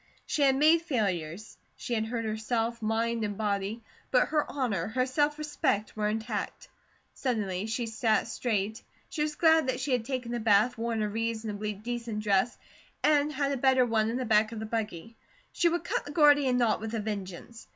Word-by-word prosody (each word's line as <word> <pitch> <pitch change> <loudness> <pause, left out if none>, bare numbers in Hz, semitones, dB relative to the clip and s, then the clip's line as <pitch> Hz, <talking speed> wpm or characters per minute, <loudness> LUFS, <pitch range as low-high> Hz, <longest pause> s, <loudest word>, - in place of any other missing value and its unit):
She 300 - -2
had 270 -1 +5
made 310 +4 +5
failures, 205 - -3 0.2
she 245 - -5
had 220 -1 0
hurt 230 0 -3
herself, 225 +2 -2
mind 225 +1 0
and 205 -1 -3
body, 210 +1 -2 0.3
but 250 - +3
her 300 -1 0
honour, 225 -12 -1
her 255 +4 0
self 290 +3 +1
respect 290 -8 -1
were 210 -1 0
intact. 220 -1 -4 0.4
Suddenly 210 -6 -2
she 230 +2 -2
sat 220 0 +1
straight. 220 -2 -2 0.3
She 305 - -4
was 300 0 -1
glad 320 -3 +4
that 255 -1 -1
she 265 +1 -2
had 245 -3 +2
taken 250 -1 -4
a 240 - -1
bath, 220 +2 +3
worn 230 -1 -1
a - - 0
reasonably 220 -1 -3
decent 230 +1 -4
dress, 205 +3 +1 0.5
and 295 0 +3
had 280 -1 -1
a 275 - -1
better 260 0 +4
one 220 -2 +1
in 235 - -2
the 255 - -2
back 215 -1 +3
of 230 - -6
the 220 - -4
buggy. 220 -1 -4 0.3
She 345 - +2
would 345 0 -1
cut - - -1
the 290 - -7
Gordian 290 -4 +5
knot 235 -3 +2
with 225 +1 -4
a - - -1
vengeance. 205 +1 -6
230 Hz, 195 wpm, -29 LUFS, 215-260 Hz, 0.5 s, had